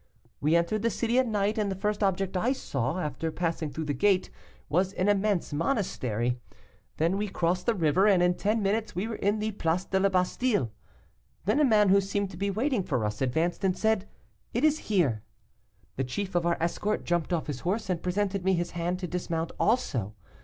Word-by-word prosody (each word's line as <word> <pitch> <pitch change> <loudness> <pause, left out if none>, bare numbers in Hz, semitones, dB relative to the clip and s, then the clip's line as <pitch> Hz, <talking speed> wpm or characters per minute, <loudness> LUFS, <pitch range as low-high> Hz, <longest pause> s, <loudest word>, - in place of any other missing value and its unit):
We 155 +3 +2
entered 170 +5 +1
the 230 - +2
city 235 +2 +1
at 260 - +2
night, 210 0 0
and 205 -1 0
the - - -2
first 210 +2 -1
object 195 -1 0
I 235 +8 +2
saw, 135 - -2
after 155 0 -3
passing 165 -2 -2
through 160 +3 -4
the 145 - -1
gate, 185 +6 +2 0.4
was 185 +4 +1
an 185 +1 0
immense 205 -5 +1
monastery; 125 - -1 0.6
then 170 +5 +1
we 210 - -1
crossed 180 0 -1
the 235 - +3
river, 180 +3 +3
and 190 -4 +5
in 180 0 +4
ten 210 +4 0
minutes 210 +1 0
we 190 +5 -1
were 225 - -4
in 205 +2 +1
the 215 +1 -1
Place 180 -2 -1
de 190 - 0
la 195 +1 +3
Bastile. 185 - +1 0.7
Then 215 +9 +2
a - - +5
man 215 -6 +5
who 200 +1 +6
seemed 200 0 -2
to 175 - -9
be 200 +2 -1
waiting 235 +3 0
for 130 -11 -1
us, 105 0 -3
advanced 160 +9 0
and 190 -1 +1
said, 220 -2 +1 0.5
'It 240 - +1
is 310 0 +4
here.' 150 - +2 0.8
The 135 - 0
chief 190 +10 -4
of 175 -1 +1
our 170 - +2
escort 205 +5 -1
jumped 175 0 -1
off 170 -3 0
his 145 -4 -4
horse, 200 +8 -2
and 180 -3 -1
presented 195 +1 -1
me 190 +1 +3
his 175 0 -2
hand 175 +1 -2
to 180 - -2
dismount 165 -1 -2
also. 130 - 0
185 Hz, 210 wpm, -28 LUFS, 165-210 Hz, 0.8 s, who